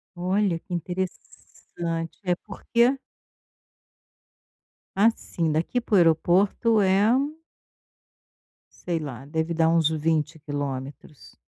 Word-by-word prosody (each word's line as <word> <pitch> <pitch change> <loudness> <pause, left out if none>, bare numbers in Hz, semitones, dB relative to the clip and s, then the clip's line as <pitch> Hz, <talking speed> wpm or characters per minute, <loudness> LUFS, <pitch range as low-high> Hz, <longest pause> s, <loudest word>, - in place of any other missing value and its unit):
Olha 185 0 0
que 180 - -10
interessante. 170 -2 -5
É 180 -2 +1
porque 235 +6 +1 2.0
Assim, 195 -6 +1
daqui 165 +10 0
para 230 - -7
o - - +7
aeroporto 185 +7 +3
é 195 +1 +3 1.7
sei 170 -2 -2
lá, 135 -4 -7
deve 160 +3 -2
dar 160 0 +3
uns 165 -2 +3
20 160 0 0
quilômetros. 145 -1 -6
170 Hz, 95 wpm, -25 LUFS, 155-190 Hz, 2.0 s, o